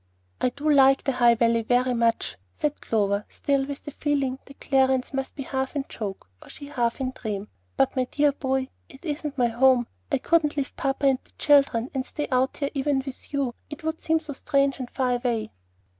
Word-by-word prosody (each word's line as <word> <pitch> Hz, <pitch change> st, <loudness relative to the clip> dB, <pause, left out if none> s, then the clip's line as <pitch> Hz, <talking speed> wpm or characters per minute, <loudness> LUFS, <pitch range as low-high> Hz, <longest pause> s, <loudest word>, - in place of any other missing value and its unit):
"I 255 Hz, -, +3 dB
do 285 Hz, +5 st, -5 dB
like 270 Hz, -2 st, +6 dB
the 275 Hz, -, +1 dB
High 240 Hz, -2 st, +5 dB
Valley 230 Hz, 0 st, +3 dB
very 245 Hz, +2 st, +2 dB
much," 230 Hz, -1 st, +1 dB, 0.2 s
said 300 Hz, -1 st, -2 dB
Clover, 200 Hz, -2 st, +1 dB
still 275 Hz, -1 st, 0 dB
with 280 Hz, -1 st, -6 dB
the 295 Hz, -, -7 dB
feeling 275 Hz, -3 st, -1 dB
that 275 Hz, -, -15 dB
Clarence 265 Hz, -1 st, +2 dB
must 270 Hz, 0 st, -3 dB
be 275 Hz, -, -4 dB
half 265 Hz, +1 st, -3 dB
in 280 Hz, -2 st, -1 dB
joke, 200 Hz, -, -6 dB
or -, -, -14 dB
she 285 Hz, -1 st, -9 dB
half 240 Hz, -4 st, 0 dB
in 260 Hz, -1 st, -1 dB
dream. 210 Hz, -5 st, -5 dB, 0.3 s
"But, 135 Hz, -, +2 dB
my 255 Hz, -1 st, +1 dB
dear 290 Hz, +3 st, +2 dB
boy, 265 Hz, -1 st, -1 dB, 0.2 s
it 270 Hz, +6 st, -14 dB
isn't 295 Hz, -2 st, -3 dB
my 245 Hz, -, +3 dB
home. 250 Hz, +1 st, +4 dB, 0.3 s
I 275 Hz, -, +3 dB
couldn't 300 Hz, +1 st, +2 dB
leave 275 Hz, -2 st, -2 dB
papa 275 Hz, +1 st, -1 dB
and 265 Hz, -2 st, +4 dB
the -, -, -27 dB
children, 275 Hz, -5 st, +3 dB
and 265 Hz, -2 st, -1 dB
stay 295 Hz, +3 st, -4 dB
out 255 Hz, +1 st, +1 dB
here, 280 Hz, -1 st, -2 dB
even 275 Hz, -1 st, 0 dB
with 270 Hz, -2 st, -9 dB
you. 275 Hz, -4 st, -1 dB, 0.2 s
It 300 Hz, +3 st, -8 dB
would 320 Hz, 0 st, -3 dB
seem 320 Hz, 0 st, +2 dB
so 310 Hz, -2 st, -7 dB
strange 275 Hz, 0 st, +1 dB
and 250 Hz, -2 st, -5 dB
far 250 Hz, -2 st, 0 dB
away." 240 Hz, -3 st, -2 dB
265 Hz, 210 wpm, -25 LUFS, 245-285 Hz, 0.3 s, like